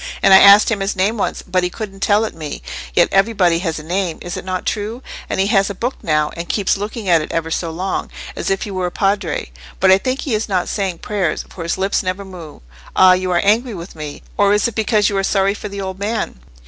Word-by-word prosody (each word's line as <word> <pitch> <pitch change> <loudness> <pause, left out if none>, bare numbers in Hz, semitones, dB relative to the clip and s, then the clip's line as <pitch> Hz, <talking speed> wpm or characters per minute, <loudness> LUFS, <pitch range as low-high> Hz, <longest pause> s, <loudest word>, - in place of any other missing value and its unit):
And 195 - +7
I 190 - +10
asked 200 +3 +8
him 215 - 0
his 195 +2 -1
name 195 +4 +1
once, 210 - -2
but 185 0 0
he 180 - 0
couldn't 195 0 -7
tell 205 +2 +3
it - - -5
me: 155 -3 -7 0.3
yet 175 - +5
everybody 195 -4 +3
has 165 -3 -2
a 155 - -7
name—is 175 0 -3
it - - -6
not 185 0 -4
true? 220 +4 -3 0.3
And - - -2
he 190 - +3
has 195 0 +3
a 200 - -5
book 245 +7 -2
now, 150 -1 +1
and 170 +1 -6
keeps 200 -3 +1
looking 205 +1 -5
at 170 -3 +4
it 155 - -6
ever 165 0 -2
so 165 0 -1
long, 185 +4 -3 0.3
as - - -3
if 195 0 0
he 205 - -6
were 185 -1 -1
a - - -5
Padre. 195 - -1 0.3
But 190 0 +5
I 190 - +6
think 255 +5 -2
he 270 - -3
is 215 0 -1
not 185 -3 0
saying 190 -4 -2
prayers, 195 -7 -1
for 180 - -9
his 165 +1 -2
lips 195 +1 0
never 185 +1 -3
move;—ah, 160 - 0
you 185 0 -1
are 175 -1 +2
angry 225 +3 +2
with 170 0 -9
me, 150 -2 -7
or 205 0 +4
is 210 - +2
it 235 - -5
because 215 -1 +2
you 200 - -1
are 195 - +1
sorry 195 0 +2
for 210 0 -7
the 200 0 -6
old 190 0 -5
man?" 215 - -3
195 Hz, 250 wpm, -18 LUFS, 175-205 Hz, 0.3 s, I